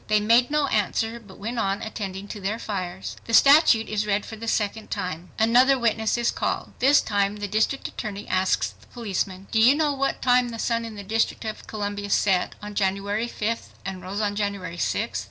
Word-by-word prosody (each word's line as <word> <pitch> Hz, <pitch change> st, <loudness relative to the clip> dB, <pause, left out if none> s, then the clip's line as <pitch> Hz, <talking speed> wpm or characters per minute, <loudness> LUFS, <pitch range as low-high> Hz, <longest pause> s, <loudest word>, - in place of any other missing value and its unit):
They 215 Hz, 0 st, +3 dB
made 230 Hz, +4 st, +4 dB
no 300 Hz, -1 st, +2 dB
answer 225 Hz, -1 st, 0 dB
but 205 Hz, -4 st, -15 dB
went 230 Hz, +4 st, -4 dB
on 195 Hz, 0 st, -1 dB
attending 200 Hz, -3 st, -5 dB
to 205 Hz, -, -7 dB
their 200 Hz, +3 st, -1 dB
fires." 190 Hz, -4 st, -5 dB
The 230 Hz, -, +2 dB
statute 275 Hz, -5 st, +6 dB
is 210 Hz, 0 st, -1 dB
read 205 Hz, 0 st, 0 dB
for 220 Hz, -, -8 dB
the 230 Hz, +1 st, -8 dB
second 215 Hz, 0 st, -1 dB
time. 180 Hz, -4 st, -4 dB
Another 250 Hz, +5 st, +5 dB
witness 220 Hz, -2 st, +1 dB
is 235 Hz, 0 st, +1 dB
called. -, -, -3 dB
This 280 Hz, +3 st, +5 dB
time 200 Hz, -1 st, 0 dB
the 205 Hz, -1 st, -4 dB
district 220 Hz, +7 st, 0 dB
attorney 205 Hz, -3 st, -6 dB
asks 185 Hz, 0 st, +1 dB
the -, -, -22 dB
policeman,—"Do 200 Hz, -2 st, -2 dB
you 250 Hz, +5 st, +7 dB
know 300 Hz, -1 st, +1 dB
what 275 Hz, 0 st, -1 dB
time 250 Hz, -1 st, +4 dB
the 230 Hz, -, -6 dB
sun 230 Hz, 0 st, -1 dB
in 225 Hz, -2 st, -8 dB
the 205 Hz, -, -7 dB
District 225 Hz, +3 st, -1 dB
of 215 Hz, -1 st, -6 dB
Columbia 205 Hz, -1 st, -4 dB
set 190 Hz, -2 st, +2 dB
on 210 Hz, 0 st, -6 dB
January 200 Hz, +3 st, 0 dB
5th 230 Hz, +1 st, -3 dB
and 190 Hz, -1 st, -5 dB
rose 190 Hz, +4 st, -4 dB
on 205 Hz, -1 st, -1 dB
January 200 Hz, -4 st, -3 dB
6th?" 110 Hz, -, -1 dB
210 Hz, 200 wpm, -25 LUFS, 200-230 Hz, -, you